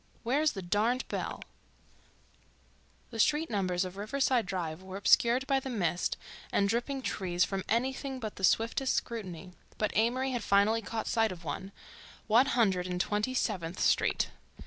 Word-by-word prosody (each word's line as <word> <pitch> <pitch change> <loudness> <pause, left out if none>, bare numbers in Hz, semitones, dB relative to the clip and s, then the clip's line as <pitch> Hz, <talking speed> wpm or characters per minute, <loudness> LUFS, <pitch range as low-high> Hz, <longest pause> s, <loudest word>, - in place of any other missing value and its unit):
Where's 285 +6 +2
the 195 - -6
darned 220 +8 +1
bell— - - -4 1.7
The 225 - -6
street 300 +6 +2
numbers 185 -3 0
of 185 +1 -8
Riverside 240 +1 +1
Drive 175 -3 -3
were 190 0 -7
obscured 235 +6 +4
by 270 -1 +2
the 265 - -6
mist 180 -7 0 0.3
and 200 - +2
dripping 245 +5 -1
trees 180 -5 0
from 195 -1 -2
anything 265 +3 -1
but 215 -3 -6
the 190 - -8
swiftest 230 +7 +2
scrutiny, 190 -6 -4 0.3
but 215 - -1
Amory 255 +4 +2
had 245 -2 -2
finally 205 +3 +3
caught 220 +2 -4
sight 225 -2 +2
of 175 -2 -9
one—One 210 - -1
Hundred 190 -8 +2
and 180 -1 -3
Twenty 210 +7 0
seventh 185 -8 -2
Street. - - +2
215 Hz, 150 wpm, -31 LUFS, 190-250 Hz, 1.7 s, obscured